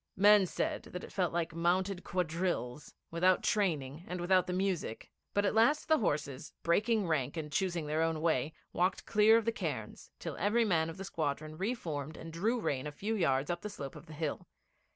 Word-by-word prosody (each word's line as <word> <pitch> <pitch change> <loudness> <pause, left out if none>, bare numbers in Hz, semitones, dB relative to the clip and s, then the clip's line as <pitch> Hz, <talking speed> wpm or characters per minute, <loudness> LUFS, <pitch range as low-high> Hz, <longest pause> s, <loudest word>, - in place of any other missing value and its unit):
Men 205 0 +7
said - - -2
that 180 - -5
it - - -10
felt 185 -4 +1
like 170 -1 -1
mounted 180 +3 +1
quadrilles 170 -6 -2 0.2
without 180 +2 +3
training 155 -7 0
and 180 0 -4
without 185 +1 +3
the - - -2
music; 180 - -2 0.2
but 205 0 +3
at - - +2
last 235 +8 +3
the 315 -1 +4
horses, 145 - -2
breaking 210 +4 +2
rank 145 -2 0
and 150 -2 -4
choosing 175 -1 0
their 155 +2 0
own 165 -1 +1
way, 155 -3 +1 0.2
walked 180 +2 +1
clear 215 +2 +6
of 230 - 0
the 230 - +2
cairns, - - -5
till - - -5
every 225 +3 +2
man 165 -5 +2
of 165 - -8
the 195 - -6
squadron 155 -2 -3
re 200 +9 -1
formed 155 - -5
and 165 0 -8
drew 220 +9 +1
rein 140 -9 -1
a - - -4
few 205 +9 -3
yards 140 -6 +1
up 175 - -3
the 210 - -5
slope 140 -10 -7
of 150 +3 -11
the 155 - -10
hill. 155 -1 -3
175 Hz, 205 wpm, -32 LUFS, 155-200 Hz, 0.2 s, Men